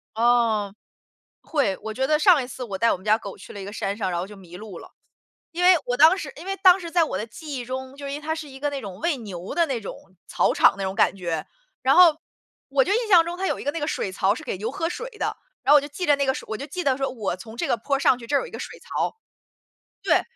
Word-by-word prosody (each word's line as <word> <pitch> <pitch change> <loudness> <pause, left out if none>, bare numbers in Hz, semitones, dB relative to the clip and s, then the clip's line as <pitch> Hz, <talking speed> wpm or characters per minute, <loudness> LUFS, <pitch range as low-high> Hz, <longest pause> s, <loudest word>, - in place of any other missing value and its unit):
哦。 225 -3 +2 0.7
会， 260 - 0
我 220 0 -5
觉 265 +1 0
得 305 +2 +3
上 330 -3 +5
一 245 - -6
次 255 - -8
我 205 -6 -4
带 230 +4 +3
我 - - 0
们 185 - -17
家 215 +1 +4
狗 200 -3 -8
去 - - -11
了 200 - -7
一 - - -6
个 200 - -7
山 200 -1 -3
上 190 -4 -2
然 175 - -1
后 180 - -4
就 205 0 -12
迷 180 -2 -12
路 205 -3 -9
了。 - - -13 0.6
因 345 +1 -4
为 365 0 +8
我 245 0 0
当 320 +6 +7
时 295 -7 -5
因 335 +5 -10
为 390 - -2
当 370 -1 +8
时 340 -3 -7
在 340 -1 +3
我 190 - -3
的 215 - -4
记 290 +5 -8
忆 245 - -4
中， 260 +2 -6
就 280 -1 -7
因 280 - -4
为 - - -7
它 315 +1 -2
是 320 -2 -7
一 270 0 -12
个 290 - 0 0.3
喂 335 -4 +1
牛 190 -6 -7
的 335 -1 +3
那 255 -5 -2
种 200 - -7 0.3
草 - - +1
场 - - +5
那 195 - -2
种 190 0 -3
感 - - +3
觉， 170 -4 -3 0.4
然 265 +1 +4
后， 345 -4 +7 0.5
我 275 -1 +3
就 385 - 0
印 460 +1 0
象 345 -4 +7
中 345 +1 -5
它 385 - -2
有 - - -1
一 - - -7
个 285 - +1
那 325 +2 -5
个 295 - -1
水 190 - -2
槽 195 +1 +2
是 - - -9
给 - - -3
牛 220 +3 -3
喝 325 +5 -2
水 475 +7 -5
的， - - -2 0.3
然 285 - +4
后 - - +10
我 290 - +6
就 290 - -7
记 300 +5 -5
着 290 - +5
那 280 - 0
个 265 - +2
水 - - -7
我 220 - -2
就 280 +6 -7
记 360 +2 -5
得 270 -2 +2
说 270 - 0
我 215 -7 -3
从 220 +4 -11
这 - - -1
个 - - +1
坡 275 +5 -1
上 260 -2 +3
去 235 - -10
这 285 +3 +1
儿 - - +3
有 - - -5
一 - - -12
个 - - -7
水 - - -7
槽， - - -3 0.9
对， - - +3
265 Hz, 320 characters per minute, -24 LUFS, 210-310 Hz, 0.9 s, 后